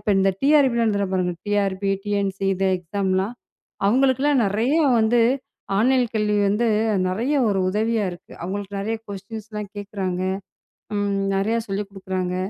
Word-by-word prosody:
இப்ப 205 - -1
இந்த 195 0 +4
டிஆர்பிலா 270 -5 +4
எழுதுரோம் 200 -3 0
பாருங்க, 180 -1 +1
டிஆர்பி, 200 -1 0
டிஎன்சி 200 -1 -1
இது 190 +1 0
எக்ஸாம்லா 190 +2 -1 0.6
அவங்களுக்கு 260 +4 +3
எல்லாம் 285 -4 +3
நெறைய 225 +9 +1 0.3
வந்து 225 +2 +3 0.6
ஆன்லைன் 255 +3 +4
கல்வி 210 -1 +1
வந்து 220 +4 +1 0.4
நெறைய 230 +10 0
ஒரு 195 - +1
உதவியா 220 +1 0
இருக்கு. 175 - -13
அவுங்களுக்கு 200 +2 -4
நெறைய 225 +3 -2
கொஸ்டின்ஸ்லா 210 +2 -7
கேக்குறாங்க. 195 -3 -3 0.8
ம், 205 -1 0 0.2
நெறைய 215 +4 +1
சொல்லிக் 195 +1 -3
குடுக்குறாங்க. 190 -2 -3
205 Hz, 135 wpm, -23 LUFS, 195-225 Hz, 0.8 s, இந்த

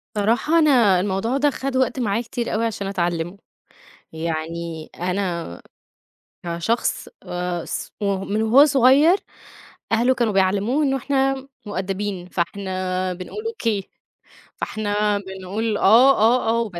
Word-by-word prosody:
صراحة 235 +10 +2
أنا 240 - +4
الموضوع 205 +7 -1
ده 290 +1 +3
خد 270 -1 -4
وقت 260 0 +1
معايا 220 -1 0
كتير 235 0 -4
أوي 225 +2 0
عشان 200 -3 -3
أتعلمه. 175 -1 -2 0.8
يعني 160 0 -4
أنا 180 - -3 0.8
كشخص، 170 +7 -1
آآ، 180 -1 -3
ص - - -5
ومن 200 +1 -1
وهو 240 +6 +6
صغير 280 +6 +5 0.7
أهله 240 +3 +3
كانوا 235 -4 0
بيعلموه 200 +9 +1
إنه 270 -1 +1
إحنا 270 0 -1 0.2
مؤدّبين، 195 -1 -4
فإحنا 185 0 -2
بنقول 185 - -7
أوكي، 230 - -2 0.7
فإحنا 210 -1 -1
بنقول 195 +3 -3
آه، 235 +7 +6
آه، 230 +1 +3
آه 230 +1 +2
وبس. 200 -7 -5
205 Hz, 120 wpm, -22 LUFS, 185-245 Hz, 0.8 s, وهو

